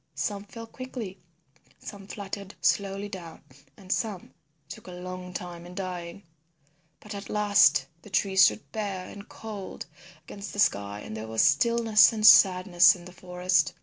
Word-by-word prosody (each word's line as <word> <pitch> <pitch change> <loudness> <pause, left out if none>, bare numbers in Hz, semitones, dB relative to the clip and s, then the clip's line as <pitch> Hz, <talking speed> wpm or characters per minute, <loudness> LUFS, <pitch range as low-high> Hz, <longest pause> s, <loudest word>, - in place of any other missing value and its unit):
Some 200 +8 -3
fell 230 +2 -10
quickly, 230 -6 -8 0.6
some 195 -1 -10
fluttered 200 -1 -7
slowly 195 0 0
down, 175 -5 -10 0.3
and 190 -2 -10
some 210 -6 -3 0.3
took - - -11
a 180 - -9
long 180 0 -8
time 175 -1 -7
in 175 +1 -12
dying. 180 0 -6 0.8
But 210 - -10
at 200 0 -8
last 200 -10 +4 0.2
the - - -14
trees 190 0 +2
stood 215 - -1
bare 195 -4 -4
and 200 0 -11
cold 210 -4 -8 0.4
against 200 0 -9
the 205 - -6
sky 100 - +1
and 110 - -8
there 110 0 -6
was 110 0 +1
stillness 225 +7 +4
and 215 -2 -2
sadness 185 -2 +7
in 175 -1 -13
the 180 - -11
forest. 180 -1 0
190 Hz, 155 wpm, -27 LUFS, 180-205 Hz, 0.8 s, sadness